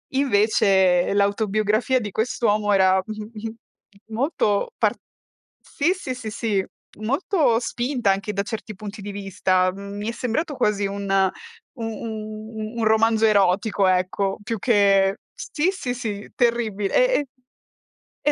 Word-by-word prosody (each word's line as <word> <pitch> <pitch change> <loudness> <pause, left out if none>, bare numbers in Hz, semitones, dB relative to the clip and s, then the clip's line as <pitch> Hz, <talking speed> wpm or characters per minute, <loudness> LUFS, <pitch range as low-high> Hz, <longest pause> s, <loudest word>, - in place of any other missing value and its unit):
Invece 200 -8 +3
l'autobiografia 215 +4 +1
di 210 -3 -5
quest'uomo 215 -1 0
era 190 -1 +4
mh, 215 - -5 0.2
mh, 220 -1 -12
molto 230 - 0
par - - +2 0.7
sì, 325 +6 0
sì, 325 -9 -5
sì, 245 -3 -6
si 210 -4 -1 0.3
molto 275 - +1
spinta, 240 -2 0
anche 200 +2 -2
da 200 0 -1
certi 215 0 -6
punti 205 +2 -8
di 205 +1 -6
vista; 185 -2 +1
mhmm, 200 +1 -8
mi 205 +1 -4
è - - -1
sembrato 270 +6 -2
quasi 210 -5 +1
un 200 0 -5 0.7
u - - -4
un 220 0 -6
un - - 0
romanzo 220 0 +3
erotico 200 -1 +3
ecco, 185 +1 +1
più 225 0 -3
che 195 -3 +3 0.2
sì, 370 -8 -1
sì, 285 -11 -4
sì 210 -4 -5
terribile. 225 -4 0
E - - +4 1.1
e 295 - +2
215 Hz, 135 wpm, -23 LUFS, 200-235 Hz, 1.1 s, era